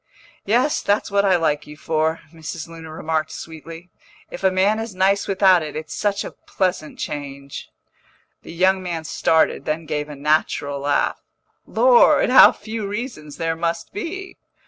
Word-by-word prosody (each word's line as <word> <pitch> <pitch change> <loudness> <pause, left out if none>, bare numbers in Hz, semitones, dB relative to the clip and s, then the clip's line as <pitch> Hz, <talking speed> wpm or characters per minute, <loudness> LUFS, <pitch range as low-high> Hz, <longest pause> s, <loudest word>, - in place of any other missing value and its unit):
"Yes, 245 +8 +2
that's 205 0 0
what 200 0 +3
I 190 -2 +4
like 150 -3 0
you 150 0 -11
for," 160 +1 -1
Mrs. 160 0 -7
Luna 165 -1 -10
remarked 155 0 -2
sweetly. 165 +2 -10 0.4
"If - - -8
a 190 - +5
man 195 +4 +2
is 225 -3 -6
nice 195 +2 +2
without 190 -2 +4
it, 155 -1 -6
it's 155 0 -6
such 205 -1 -1
a - - -7
pleasant 185 -5 -3
change." 140 -1 -6 0.7
The - - -11
young 185 +3 +2
man 170 -3 -4
started, 160 +1 +1
then 155 +1 -2
gave 150 0 -3
a 150 - -7
natural 145 -1 0
laugh. 145 +1 0 0.5
"Lord, - - +5
how - - +9
few 220 -2 -6
reasons 200 - -6
there 165 0 -1
must 170 0 -3
be!" 380 - -6
165 Hz, 160 wpm, -21 LUFS, 155-200 Hz, 0.7 s, how